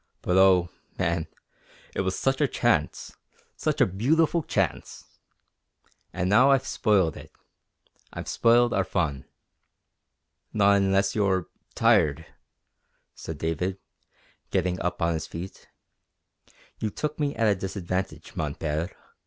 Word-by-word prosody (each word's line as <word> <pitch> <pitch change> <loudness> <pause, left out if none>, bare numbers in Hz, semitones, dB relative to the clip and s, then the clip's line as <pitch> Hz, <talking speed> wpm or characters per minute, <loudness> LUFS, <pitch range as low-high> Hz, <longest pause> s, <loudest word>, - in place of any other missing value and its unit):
But 90 - 0
oh, 95 -2 +5 0.3
man, 85 -1 -1 0.7
it - - -1
was 95 0 -2
such 135 +2 0
a 145 - +4
chance - - 0 0.4
such - - -2
a - - +6
beautiful 155 - +1
chance! - - -2 1.1
And 90 - -2
now 120 +8 +5
I've 135 -1 +3
spoiled 100 - +1
it. - - -12 0.8
I've - - -7
spoiled 120 +1 +3
our 100 - +2
fun." 80 -8 -2 1.3
"Not 100 -1 +4
unless 100 0 +2
you're 95 -4 0 0.3
tired," 75 +2 +3 0.9
said 80 - -7
David, 80 +5 -2 0.7
getting 90 -1 -1
up 90 0 -2
on 85 0 +2
his 80 - -4
feet. 90 +3 -9 1.1
"You 110 - -1
took 150 +9 -4
me 145 -1 -1
at 115 - +1
a 105 - +4
disadvantage, 95 -1 -4
mon - - -3
Père. 80 +2 -2
95 Hz, 125 wpm, -26 LUFS, 85-110 Hz, 1.3 s, a